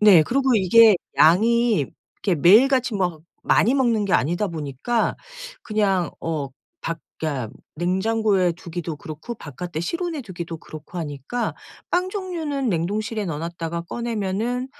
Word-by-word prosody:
네. 200 -7 +8
그리고 260 - +2
이게 210 +2 +6 0.2
양이 215 - +4 0.3
이게 190 -4 +1
매일같이 235 - +5
막 180 -5 -1 0.2
많이 245 +6 +3
먹는 235 -6 +2
게 - - -2
아니다 175 +9 +2
보니까 155 - -1 0.5
그냥 195 -6 +1
어 155 -4 -2 0.3
밖 165 0 -3 0.2
그니까 140 -8 -3 0.2
냉장고에 190 +2 +1
두기도 170 -2 -6
그렇고 155 +11 -7
바깥에 160 - -6
실온에 335 - -3
두기도 170 -5 -6
그렇고 155 +3 -11
하니까 155 - -3 0.4
빵 360 +1 +1
종류는 325 - -2
냉동실에 205 +5 -1
넣어 165 -4 -3
놨다가 170 0 -4
꺼내면은 230 +4 -2
190 Hz, 305 characters per minute, -23 LUFS, 165-235 Hz, 0.5 s, 네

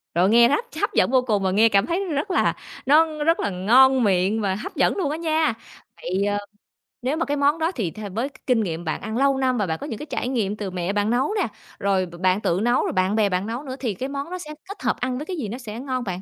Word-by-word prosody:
Rồi, 180 +3 +4
nghe 235 +1 +7
hấp 445 +12 +1 0.2
hấp - - 0
dẫn - - +3
vô 260 -1 +4
cùng 210 -5 0
và 190 - +1
nghe 220 +4 +5
cảm 200 +1 +3
thấy, 340 +6 -1
ừm, 340 -6 -3
rất 370 +8 -2
là - - +2 0.3
nó 305 +1 +3
rất 330 +2 +3
là 205 - 0
ngon 250 +8 +4
miệng 195 +2 +2
và 190 -2 0
hấp 215 - -7
dẫn - - +2
luôn 295 -7 0
á 310 - -2
nha! 315 -4 +1 0.5
Vậy, 190 +3 -1
ờ, 205 0 0 0.6
nếu 265 +5 -1
mà 330 - 0
cái 290 0 -1
món 290 +3 +2
đó 325 +3 +1
thì 210 - -3
th - - -12
với 240 +7 -1
cái - - -21
kinh 245 -3 +3
nghiệm 170 -3 -4
bạn 160 - -3
ăn 220 +2 -4
lâu 275 0 +3
năm 255 -2 +1
và 205 - +1
bạn 160 - -2
có 285 - -5
những 225 - -5
cái 300 - -6
trải 245 - -3
nghiệm 215 -6 -1
từ 195 -3 -4
mẹ 180 +2 -2
bạn 205 +1 +1
nấu 260 - +1
nè, - - +1 0.3
rồi 195 -2 +1
b 175 - -12
bạn 185 +3 +2
tự 175 +3 +1
nấu, 240 +2 +2
rồi - - -1
bạn 185 +2 +1
bè 215 -2 +3
bạn 185 +3 -1
nấu 240 +5 -4
nữa 260 -3 -6
thì 230 -6 -2
cái 260 +8 -5
món 280 +3 -4
đó 365 - -3
sẽ 305 -3 -8 0.2
kết 400 - -8
hợp - - +1
ăn 250 0 -2
với 295 - -5
cái 365 0 -5
gì 235 -8 -3
nó 240 - -5
sẽ 230 -2 -7
ngon 255 -2 -3
bạn? 185 -4 -4
240 Hz, 295 wpm, -23 LUFS, 200-280 Hz, 0.6 s, nghe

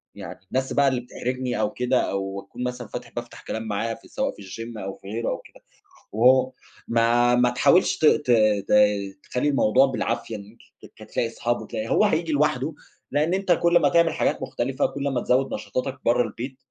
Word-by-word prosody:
يعني - - -9
الناس 130 0 -1
بقى 140 -1 +3
اللي 130 -2 +1
بتحرجني 125 0 -3
أو 105 - +1
كده 125 0 +1
أو 100 0 -3
أكون 120 +5 -8
مثلًا 125 -2 -4
فاتح 120 +1 -8
بافتح 120 0 -7
كلام 110 - -4
معاها 115 +2 -2
سواء - - -2
في - - -13
الgym 115 +4 -8
أو 95 0 -5
في - - -15
غيره 115 +3 -2
أو - - -3
كده، - - -18 0.5
وهو 130 +4 +4 0.4
ما 120 +1 +3
ما 125 0 +4
تحاولش 130 +8 +3
ت - - +1
ت 145 -4 +4 0.4
ت - - +1 0.6
تخلي 135 +4 +1
الموضوع 130 -1 +4
بالعافية 115 -3 -2
إن 100 - -7
أنت 115 - -22 0.4
تت - - -13
تلاقي 115 - 0
أصحاب 120 +1 -2
وتلاقي 110 -1 -5
هو - - +3
هييجي 165 -4 0
لوحده، 150 0 +1 0.4
لإن 155 +4 +1
أنت 195 -1 0
كل 170 0 +4
ما - - +3
هتعمل 170 -2 +3
حاجات - - 0
مختلفة، 130 +3 -1
كل 140 - -6
ما 125 - 0
تزود 130 +2 +1
نشاطاتك 130 +1 -4
برّه 120 +1 +4
البيت 125 +3 -6
125 Hz, 195 wpm, -24 LUFS, 115-135 Hz, 0.6 s, وهو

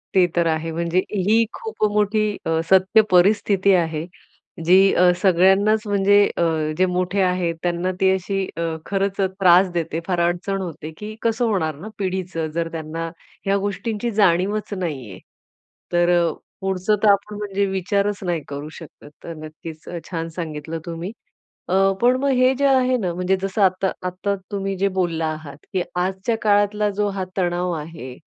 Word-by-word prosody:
ते 185 -1 +6
तर 170 -1 +2
आहे. 160 0 -1
म्हणजे 170 +2 0
ही 210 +3 +3
खूप 445 - -6
मोठी 210 +1 +2 0.2
अ, 160 0 +1
सत्य 190 +3 +5
परिस्थिती 200 +1 +4
आहे. 160 -3 0 0.6
जी 180 +3 +6 0.2
अ, 180 0 +5
सगळ्यांनाच 195 +4 +4
म्हणजे 205 0 +4 0.2
अ, - - +1 0.4
जे 185 - +4
मोठे 180 +2 0
आहेत 180 -2 +1
त्यांना 175 +1 0
ती 190 0 +5
अशी 195 +1 -2
अ, - - -2 0.2
खरंच 195 0 -1 0.2
त्रास 185 0 +6
देते 165 -1 -2
फार 180 -2 0
अडचण 190 +3 -2
होते, 160 -3 -6
की 215 +1 -7
कसं 230 +1 +1
होणार 160 -7 0
ना 170 +9 -9
पिढीचं? 185 -4 -2
जर 165 -1 -1
त्यांना 165 +1 -5 0.4
ह्या 200 0 +2
गोष्टींची 210 +3 -3
जाणीवच 205 +1 +1
नाही 150 - -4
आहे. 95 - -10 0.7
तर 175 0 +3 0.5
पुढचं 190 +2 +1
तर 215 - +5
आपण 200 +1 0
म्हणजे 200 -1 -1
विचारच 200 +2 -1
नाही 175 -3 -1
करू 145 +2 -6
शकत. 155 -3 -13
तर 165 - -6
नक्कीच 155 +1 -10
अ, 175 - -5
छान 165 -1 -3
सांगितलं 160 -1 -5
तुम्ही. 170 +3 -5 0.6
अ, 185 - +1 0.3
पण 245 +1 +5
मग 280 - +1
हे 255 +1 +4
जे 280 +2 0
आहे 255 -1 +3
ना 185 -6 -2
म्हणजे 180 +2 +1
जसं 195 +2 -2
आता 190 0 +2 0.2
आता 195 +3 -2 0.2
तुम्ही 195 -1 -2
जे 200 +2 +2
बोलला 165 -2 0
आहात, 155 -2 -5 0.2
की 185 - +1
आजच्या 190 +5 -1
काळातला 205 0 +2
जो 210 0 +1
हा 195 -1 -3
तणाव 175 0 0
आहे 150 -5 -8
185 Hz, 165 wpm, -22 LUFS, 170-200 Hz, 0.7 s, ते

